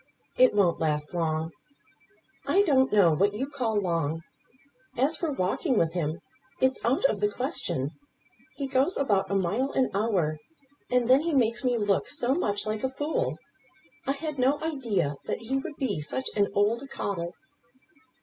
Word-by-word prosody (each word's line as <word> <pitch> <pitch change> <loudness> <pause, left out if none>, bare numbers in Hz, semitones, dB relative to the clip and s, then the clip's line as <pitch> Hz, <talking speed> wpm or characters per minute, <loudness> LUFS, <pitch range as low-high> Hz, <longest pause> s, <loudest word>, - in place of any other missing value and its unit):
"It 255 -4 +5
won't 185 -5 +3
last 150 -1 -1
long." 160 -1 -1 1.0
"I 400 - +4
don't 265 -7 +3
know 195 -5 +5
what 200 +7 +2
you 255 +5 -1
call 245 -7 -1
long. 165 -4 -1 0.8
As 275 +6 +2
for 330 -3 -2
walking 255 - 0
with 165 -3 +2
him, 165 -2 -2 0.4
it's 260 0 +1
out 260 +4 +2
of 215 - +2
the 205 0 +2
question. 205 - -2 0.6
He 280 - -3
goes 270 +6 +1
about 200 -8 +1
a 195 - 0
mile 205 +9 0
an 260 -4 +1
hour. 190 -7 0 0.5
And 250 -1 +2
then 260 +3 +6
he 325 -1 -1
makes 240 -1 +2
me 250 -2 +2
look 205 -3 +1
so 265 -3 +1
much 205 - -1
like 215 0 -3
a 265 - +1
fool. 300 - -2 0.7
I 275 - +2
had 300 0 -5
no 270 +4 +3
idea 220 - -1
that - - -2
he 255 +4 -1
would 280 +2 -5
be 210 - -2
such 260 - -3
an 200 -1 +3
old 210 +4 +2
coddle." 180 -9 -4
225 Hz, 170 wpm, -27 LUFS, 185-270 Hz, 1.0 s, then